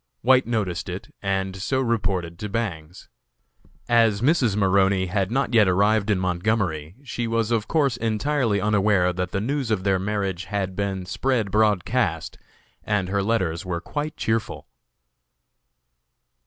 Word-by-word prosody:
White 130 0 +4
noticed 105 -7 -2
it, - - -7
and 95 -1 -1
so 115 +8 -1
reported 95 -8 -1
to 105 - -4
Bangs. 90 -7 -4 0.8
As 115 -3 +3
Mrs. 130 - +3
Maroney 95 -1 +3
had 95 +1 -1
not 135 +2 -1
yet 110 -4 +5
arrived 100 +3 +2
in 100 -3 +2
Montgomery, 90 -3 -1
she 120 -3 -3
was 115 0 0
of 110 -2 0
course 140 -7 +1
entirely 115 0 0
unaware 100 -3 +2
that 90 0 -3
the 100 - -2
news 135 +3 -2
of 105 -4 0
their 95 -1 +2
marriage 95 -2 -2
had 95 -3 -3
been 95 -2 -2
spread 110 +1 -1
broadcast, 105 -4 +1 0.4
and 100 -3 -1
her 100 +1 0
letters 90 -6 0
were 90 -2 -3
quite 150 - -5
cheerful. 110 -1 -2
100 Hz, 140 wpm, -24 LUFS, 95-115 Hz, 0.8 s, yet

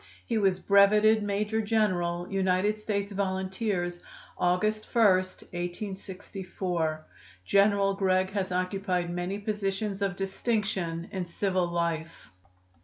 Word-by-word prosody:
He 230 -2 0
was 195 -3 +3
breveted 210 +3 +5
major 210 +2 0
general 180 -5 0
United 195 +2 +1
States 205 -1 -2
volunteers, 190 -2 -2 0.4
August 215 +5 +1
1, 230 -2 +4
1864. 185 -3 -2 0.4
General 200 - +4
Gregg 185 -1 +1
has 195 -2 -2
occupied 180 -1 -1
many 180 +3 -2
positions 205 -1 -2
of 195 -2 0
distinction 195 -4 -2
in 190 -2 -2
civil 185 0 0
life. 170 -1 -3
195 Hz, 105 wpm, -28 LUFS, 180-205 Hz, 0.4 s, breveted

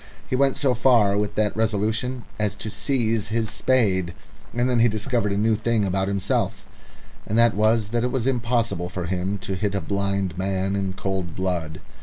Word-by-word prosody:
He - - -1
went 135 0 +2
so 135 -3 +2
far 115 -5 +4
with 105 0 -1
that 105 -1 +1
resolution 110 +3 -1 0.2
as 105 -1 0
to 110 +1 -6
seize 115 -2 0
his 110 0 -1
spade, 95 -8 +1 0.4
and 120 +1 0
then 125 -2 +2
he 115 - +6
discovered 110 -1 -1
a 100 - 0
new 110 +2 +3
thing 110 0 +1
about 95 0 0
himself, 100 -1 -1 0.6
and 110 - 0
that 115 -1 +5
was 110 +1 +2
that 120 +1 0
it 125 - +1
was 125 -3 -1
impossible 120 -8 0
for 90 -1 -4
him 95 +2 -2
to 100 0 -5
hit 100 +1 -1
a - - +1
blind 100 -3 -2
man 95 +1 -1
in 95 -1 -2
cold 95 -3 -3
blood. 85 -4 -2
105 Hz, 190 wpm, -24 LUFS, 95-115 Hz, 0.6 s, he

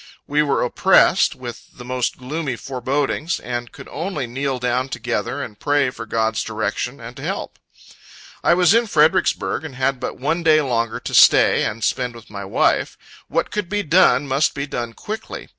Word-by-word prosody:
We 145 +1 +1
were 145 -2 +1
oppressed 125 - +4
with 120 -2 -10
the 125 - -10
most 125 -1 -2
gloomy 140 +1 -4
forebodings, 135 +6 -2
and 120 -1 -5
could - - -12
only 165 -4 -3
kneel 130 +2 -2
down 125 +1 -1
together 120 +2 -3
and 105 -2 -9
pray 145 -3 +1
for 115 - -9
God's 110 -1 0
direction 110 +4 -3
and 120 +1 -10
help. - - -5 0.8
I 170 - +4
was 180 +1 +5
in 230 0 +3
Fredericksburg, 160 -2 +2
and 150 -5 -8
had 130 0 0
but 125 - -5
one 160 +7 -1
day 155 -2 +5
longer 115 -4 -1
to - - -6
stay, - - +6
and 115 +1 -4
spend 125 0 -1
with 115 -2 -14
my 100 -1 -6
wife. 95 - +1 0.3
What - - -1
could 210 -4 -3
be 205 0 -1
done, 145 -5 +4
must 135 +3 +1
be 140 -1 -2
done 120 -4 -4
quickly. 220 - -7
130 Hz, 175 wpm, -21 LUFS, 120-150 Hz, 0.8 s, stay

